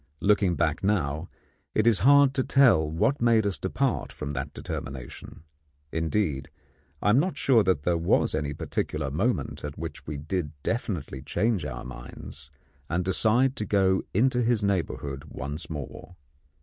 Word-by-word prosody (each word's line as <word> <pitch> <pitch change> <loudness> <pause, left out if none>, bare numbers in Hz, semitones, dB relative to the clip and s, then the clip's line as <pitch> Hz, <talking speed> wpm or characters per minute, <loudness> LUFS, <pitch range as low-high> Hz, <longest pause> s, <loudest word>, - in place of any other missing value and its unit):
Looking 100 -3 +3
back 80 0 0
now, 85 -5 0 0.5
it 110 - +3
is 115 -5 +5
hard 140 +5 +6
to 135 -2 +1
tell 120 - +4
what 125 - 0
made 115 -2 +4
us 100 -2 -1
depart 130 +7 -1
from 70 -1 -5
that 70 +1 -4
determination; 65 +1 -7 0.5
indeed, 80 -4 -1 0.5
I 105 - +4
am 120 - +5
not 180 +5 -1
sure 125 -5 +4
that 90 -7 +1
there 85 -1 +1
was 85 - +2
any 75 -2 -2
particular - - -3
moment - - -1
at 75 0 -6
which 80 0 -7
we 75 -1 -4
did 75 +1 -3
definitely 90 - -3
change 100 - 0
our 65 -4 -5
minds 65 +1 -10 0.4
and 90 +1 0
decide 115 +7 +2
to 105 - -2
go 95 -2 +2
into 125 +4 +2
his 115 -2 +2
neighbourhood 80 -8 -2
once 70 +2 -6
more. 80 +3 -7
90 Hz, 155 wpm, -27 LUFS, 75-110 Hz, 0.5 s, hard